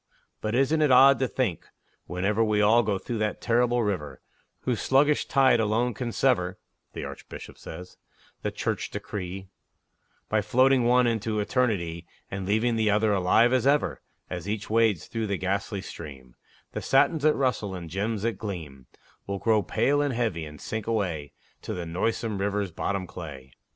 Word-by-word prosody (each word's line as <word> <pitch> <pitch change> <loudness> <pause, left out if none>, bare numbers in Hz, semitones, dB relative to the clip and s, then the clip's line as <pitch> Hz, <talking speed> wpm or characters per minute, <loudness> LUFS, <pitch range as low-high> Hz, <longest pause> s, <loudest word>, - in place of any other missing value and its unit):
But 110 +1 -1
isn't 135 +5 +2
it 150 - +4
odd 135 +2 +7
to 130 - +1
think, 110 -6 -2 0.4
whenever 100 +5 0
We 105 -1 +1
all 110 +3 +5
go 105 -3 0
through 115 +3 -4
that 105 -1 -1
terrible 120 0 +2
River 90 -8 -3 0.4
Whose 125 -3 -1
sluggish 145 +3 +3
tide 130 -3 +4
alone 115 +3 +1
can 120 +1 -4
sever 95 -9 +1 0.4
(The - - -5
Archbishop - - -9
says) 90 +3 -10 0.4
the - - -1
Church - - -3
decree, 95 -1 -6 0.8
By 110 0 +1
floating 130 +4 +3
one 125 +1 +4
in 115 -2 +1
to 110 0 -2
Eternity 100 -8 -1 0.2
And 95 -1 -4
leaving 115 +3 +1
the 110 -1 +2
other 105 +1 +3
alive 100 +6 +4
as 130 0 +2
ever 145 +1 +2 0.3
As 90 +2 -5
each 105 0 -4
wades 110 -6 +2
through 115 -2 -3
that 100 -1 -1
ghastly 100 +2 -2
stream, 70 -9 -10 0.4
The - - -4
satins 150 +4 +3
that 155 +1 +4
rustle 125 -8 -1
and 85 -2 -7
gems 100 +5 -2
that 115 0 -1
gleam, 80 - -7 0.4
Will 100 0 -2
grow 110 +1 +2
pale 140 +9 +1
and 145 -4 0
heavy, 110 -9 -1
and 75 0 -11
sink 110 -1 -5
away 90 -10 -2 0.3
To - - -5
the 90 - -4
noisome 105 +5 -2
River's 100 -1 -1
bottom 95 +3 -2
clay! 75 -8 -9
105 Hz, 170 wpm, -26 LUFS, 95-120 Hz, 0.8 s, odd